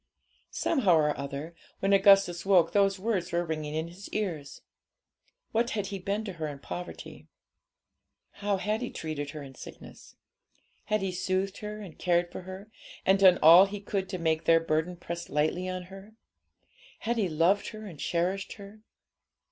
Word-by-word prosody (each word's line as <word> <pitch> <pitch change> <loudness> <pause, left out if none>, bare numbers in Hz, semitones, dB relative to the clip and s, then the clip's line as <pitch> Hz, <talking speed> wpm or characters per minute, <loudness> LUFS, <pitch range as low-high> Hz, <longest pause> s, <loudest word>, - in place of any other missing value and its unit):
Somehow 215 - +2
or 150 -2 +2
other, 140 +4 -6 0.3
when 195 +1 +2
Augustus 195 -3 +5
woke, 185 -4 +4
those 195 -1 +3
words 190 -3 -2
were 170 0 0
ringing 155 -2 -4
in 160 +1 -2
his 185 +4 -11
ears. 170 -9 -4 0.9
What 230 +2 +1
had 205 - -1
he 195 - -3
been 200 +4 -2
to 195 - -5
her 155 - -1
in 145 -1 -6
poverty? 175 +5 -8 1.1
How 205 -1 +1
had 210 +4 -1
he 245 - -3
treated 155 -3 -5
her 150 0 -7
in 135 -1 -11
sickness? - - -12 0.7
Had 215 -2 0
he 195 -1 -1
soothed 185 +2 -2
her 210 0 -6
and 185 -6 -11
cared 175 -1 +1
for - - -7
her, 190 +3 -10 0.3
and 190 +1 +4
done 185 -2 +7
all 170 +5 +9
he 205 +1 -6
could 195 -1 -3
to 185 - -3
make 160 -1 0
their 165 0 +6
burden 165 +2 -1
press 170 0 -6
lightly 155 +5 0
on 185 0 -4
her? 195 +4 -13 0.9
Had 235 +1 -1
he 200 -5 +1
loved 170 +6 +2
her 215 0 -8
and 170 -8 -10
cherished 180 +6 -1
her? 205 +1 -13
185 Hz, 170 wpm, -29 LUFS, 165-200 Hz, 1.1 s, all